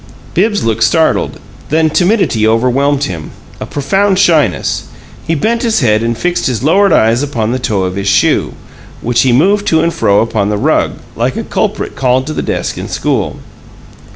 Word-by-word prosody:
Bibbs 205 +3 +1
looked 115 0 -1
startled; 160 -2 +1 0.3
then 160 +1 +2
timidity 175 - +2
overwhelmed 130 +5 +1
him 85 - -5 0.3
a - - -6
profound 195 +8 0
shyness. 155 - +1 0.4
He 165 - +1
bent 230 +10 0
his 230 -7 +1
head 110 -3 +2
and 115 0 -1
fixed 175 +5 -1
his 125 -2 -2
lowered 195 +7 +3
eyes 115 +3 +3
upon 120 -6 -2
the 130 - -1
toe 105 -6 -1
of 90 0 -2
his 100 0 -3
shoe, - - +2 0.5
which 120 0 +1
he 130 - +2
moved 200 +11 +2
to 160 - +3
and 170 +1 0
fro 100 0 +2
upon 110 -3 -1
the 105 - -1
rug, - - +1 0.2
like - - -1
a - - -3
culprit - - -2
called 130 0 +1
to 155 - -4
the - - -2
desk - - -3
in - - -5
school. - - -2
135 Hz, 180 wpm, -13 LUFS, 115-175 Hz, 0.5 s, lowered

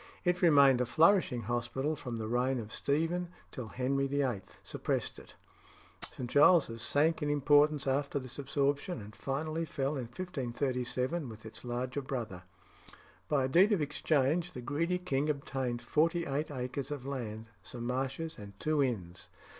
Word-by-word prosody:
It 180 0 +2
remained 140 -7 +6
a - - +2
flourishing 160 - +4
hospital 120 +6 -1
from 125 -5 -5
the 110 -1 -3
reign 125 +3 +1
of 110 -2 -6
Stephen 165 +5 0 0.2
till 125 -4 -6
Henry 135 +3 0
VIII. 135 -7 0 0.2
suppressed - - -2
it. - - -15 0.7
St. 125 - -6
Giles's 145 -4 +5
sank 155 +7 +2
in 150 - 0
importance 145 0 +4
after 140 +1 0
this 130 0 -5
absorption, 140 +3 0
and 105 +1 -10
finally 155 +4 -2
fell 145 -2 -2
in 130 - -3
1537 130 0 -2
with 110 0 -11
its 110 - -6
larger 125 +2 -2
brother. 115 -9 -5 0.8
By 145 -3 +2
a - - +1
deed 185 +10 +5
of 190 - +1
exchange 150 +3 +1
the 125 - -6
greedy 165 +8 0
king 150 -5 -1
obtained 130 -4 -2
forty 165 +6 +2
eight 145 +3 -2
acres 130 0 -4
of 145 -3 -5
land, 115 -5 -5
some 115 +6 -7
marshes, 135 +5 -2
and 100 -1 -11
two 155 -1 +1
inns. 95 -10 -3
135 Hz, 155 wpm, -32 LUFS, 120-150 Hz, 0.8 s, remained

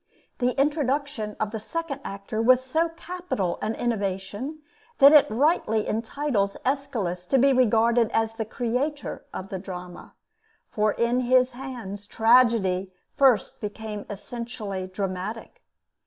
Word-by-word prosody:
The 250 +1 0
introduction 285 -6 0
of 215 -1 -1
the 220 - -4
second 320 +5 -4
actor 200 +2 -4
was 255 +2 +5
so 320 +5 +1
capital 340 - -4
an 220 +1 -1
innovation 210 +6 -3 0.3
that 280 0 +9
it 300 -2 +7
rightly 225 -3 +1
entitles 225 -2 -1
Aeschylus 220 -10 -2
to 270 - +3
be 270 +2 +5
regarded 235 -2 +3
as 225 0 +1
the 225 0 -3
creator 250 +6 -3
of 190 - -7
the 190 - -4
drama, 180 -1 -9 0.6
for 215 -1 +1
in 235 +1 +1
his 255 0 +3
hands 240 -6 -7
tragedy 225 -6 +3 0.2
first 260 -7 +3
became 210 0 -6
essentially 210 -3 -5
dramatic. 190 +3 -5
230 Hz, 125 wpm, -25 LUFS, 205-265 Hz, 0.6 s, that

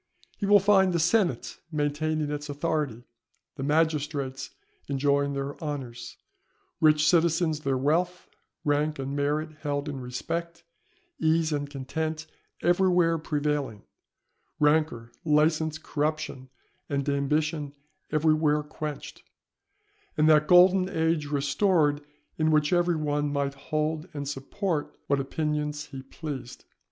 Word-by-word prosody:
He 200 - -1
will 205 0 +7
find 190 -2 +4
the 170 - +1
senate 175 - +1
maintaining 150 0 -1
its 150 0 -4
authority, 145 -5 -2 0.5
the 135 - -7
magistrates 145 -2 0 0.4
enjoying 140 0 +1
their 140 +1 -3
honours, 125 -6 -6 0.6
rich 155 -1 +4
citizens 165 -2 +3
their 135 -3 0
wealth, 170 +7 0 0.4
rank 150 +1 +1
and 135 +1 -4
merit 150 +2 -1
held 145 -1 -2
in 140 -3 -5
respect, 170 +7 -4 0.6
ease 160 0 +2
and 145 -1 -2
content 155 +3 -4 0.4
everywhere 175 -2 +3
prevailing, 150 -7 -2 0.8
rancour, 150 -6 +2
licence, 155 0 +2
corruption 150 -4 -3 0.4
and 140 -1 -1
ambition 145 +1 0 0.4
everywhere 155 -1 +2
quenched, 150 -1 -7 1.0
and 155 0 +4
that 150 -1 +5
golden 185 +1 +6
age 160 -3 0
restored 145 +1 +2 0.4
in 155 0 +3
which 150 +1 +3
every 175 -1 +3
one 145 -1 -1
might 140 -1 -1
hold 155 +4 -2
and 140 -1 -4
support 145 +4 -3
what 140 0 +1
opinions 150 +1 -2
he 135 -1 -6
pleased. 130 -2 -8
150 Hz, 115 wpm, -27 LUFS, 140-160 Hz, 1.0 s, will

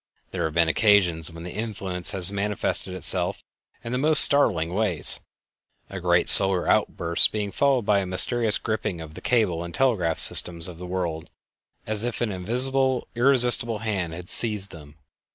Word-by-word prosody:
There - - -3
have 80 0 -5
been 85 -1 +2
occasions 90 -4 +1
when 85 0 -11
the 90 - -8
influence 100 -5 -4
has 95 0 +2
manifested 100 -2 -1
itself 95 - +1 0.4
in 115 - -7
the 125 - -2
most 155 +2 +5
startling 90 - +1
ways, 95 -7 -1 0.7
a 95 - -6
great 85 -1 +1
solar 95 -2 +5
outburst 85 0 +1
being 105 -2 -4
followed 135 +1 0
by 100 -1 +2
a 95 - -4
mysterious 110 +4 +1
gripping 110 -5 -4
of 80 -1 -10
the - - -12
cable 105 -9 -1
and 85 0 -8
telegraph 100 -12 0
systems 85 -1 0
of 85 -2 -11
the 90 - -8
world, 85 -3 -5 0.6
as 110 0 -4
if 120 -1 -4
an 115 -3 -2
invisible 125 +7 +1
and 120 - -7
irresistible 120 -4 +4
hand 100 -6 -4
had 90 +2 -7
seized 105 -4 -1
them. 75 -3 -14
100 Hz, 170 wpm, -23 LUFS, 85-115 Hz, 0.7 s, most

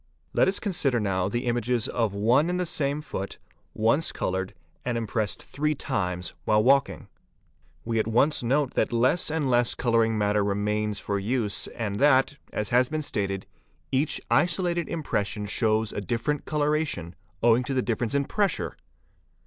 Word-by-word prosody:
Let - - +4
us 190 - +1
consider 150 - 0
now 95 -3 0
the 120 +4 -2
images 120 0 0
of 115 -4 0
one 120 +10 +3
and 180 0 -1
the 180 - 0
same 150 -3 -1
foot 95 -9 -5 0.4
once 115 +9 +2
coloured 95 0 -3 0.3
and 120 -1 -1
impressed 110 -2 -2
three 150 +1 -1
times 90 -11 -2
while 105 0 +3
walking. 135 +2 +2 0.8
We 115 -1 0
at 110 - 0
once 135 +7 +3
note 130 +3 +1
that - - +1
less 125 +10 +2
and 155 -2 0
less 120 -2 +2
colouring 115 -2 +2
matter 105 0 +2
remains 105 +1 -1
for 100 0 -2
use 105 0 -1
and 105 -3 -4
that, 140 0 +4
as 105 - -2
has 125 +1 +3
been 155 -1 -2
stated, 100 -7 -2 0.5
each 140 +3 +1
isolated 170 +5 +2
impression 105 -9 -2
shows 110 +1 0
a - - -3
different 120 - -2
coloration 150 - -1 0.3
owing 120 +1 +5
to 135 - -2
the 130 - +1
difference 115 +1 -1
in 140 0 +2
pressure. 205 +4 -1
120 Hz, 160 wpm, -26 LUFS, 105-145 Hz, 0.8 s, owing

